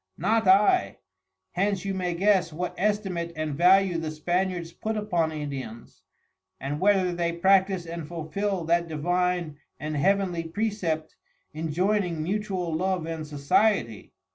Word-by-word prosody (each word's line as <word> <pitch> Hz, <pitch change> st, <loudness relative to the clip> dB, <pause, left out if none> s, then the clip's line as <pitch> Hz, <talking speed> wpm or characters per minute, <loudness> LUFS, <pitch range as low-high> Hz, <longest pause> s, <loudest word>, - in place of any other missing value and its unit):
Not 220 Hz, -2 st, +1 dB
I. 210 Hz, -, +4 dB, 0.5 s
Hence 195 Hz, +1 st, -1 dB
you 195 Hz, -, -1 dB
may 180 Hz, -2 st, -2 dB
guess 190 Hz, -2 st, +2 dB
what 175 Hz, +4 st, -4 dB
estimate 190 Hz, -4 st, -1 dB
and 155 Hz, -1 st, -3 dB
value 180 Hz, +2 st, +4 dB
the 160 Hz, -1 st, -3 dB
Spaniards 175 Hz, +2 st, -2 dB
put 220 Hz, +3 st, -3 dB
upon 175 Hz, -6 st, 0 dB
Indians, 140 Hz, -6 st, -7 dB, 0.6 s
and 140 Hz, +3 st, -3 dB
whether 190 Hz, -2 st, +3 dB
they 170 Hz, -1 st, -1 dB
practise 190 Hz, 0 st, +3 dB
and 165 Hz, -2 st, -6 dB
fulful 175 Hz, +3 st, -3 dB
that 170 Hz, +1 st, +2 dB
Divine 175 Hz, 0 st, -1 dB, 0.2 s
and 155 Hz, +2 st, -4 dB
Heavenly 180 Hz, +2 st, +1 dB
precept 165 Hz, -4 st, -2 dB, 0.4 s
injoyning 175 Hz, +4 st, 0 dB
mutual 185 Hz, 0 st, -2 dB
Love 185 Hz, 0 st, -1 dB
and 160 Hz, -2 st, -5 dB
Society. 145 Hz, -, 0 dB
175 Hz, 130 wpm, -26 LUFS, 160-195 Hz, 0.6 s, I